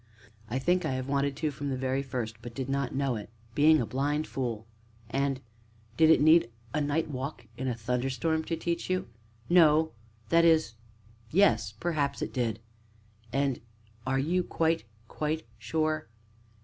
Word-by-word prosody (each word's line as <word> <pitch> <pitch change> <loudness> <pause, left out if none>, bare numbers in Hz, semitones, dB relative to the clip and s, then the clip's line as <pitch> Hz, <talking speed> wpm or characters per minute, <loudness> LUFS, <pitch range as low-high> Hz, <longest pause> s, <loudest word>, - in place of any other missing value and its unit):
"I 120 - -1
think 180 +7 +2
I - - -1
have 130 0 -3
wanted 140 0 0
to 155 +1 -1
from 140 0 -4
the 130 - -1
very 130 +1 0
first, 120 -4 -4
but 120 0 -9
did 130 -2 -3
not 135 -2 -1
know 135 -2 +1
it 105 - -8 0.2
being 155 +3 +6
a 120 - 0
blind 145 +5 0
fool!" 115 -5 -3 0.5
"And 135 -1 0 0.6
did 160 -1 +5
it 160 - +7
need 155 -4 +6 0.2
a 150 - +1
night 145 +3 0
walk 135 +2 -5
in 130 - -3
a 125 - 0
thunderstorm 130 +7 0
to 165 - -1
teach 170 +2 -2
you?" 185 -8 -1 0.4
"No 160 -2 +5 0.4
that 170 +5 +5
is, 160 -7 +4 0.6
yes 165 - +3
perhaps 145 +3 -1
it - - -5
did." 115 -4 -1 0.7
"And 135 -2 0 0.5
are 135 0 +2
you 170 +7 +1
quite, 165 -3 0 0.2
quite 155 +1 -2 0.2
sure?" 155 +6 -1
140 Hz, 160 wpm, -29 LUFS, 130-160 Hz, 0.7 s, it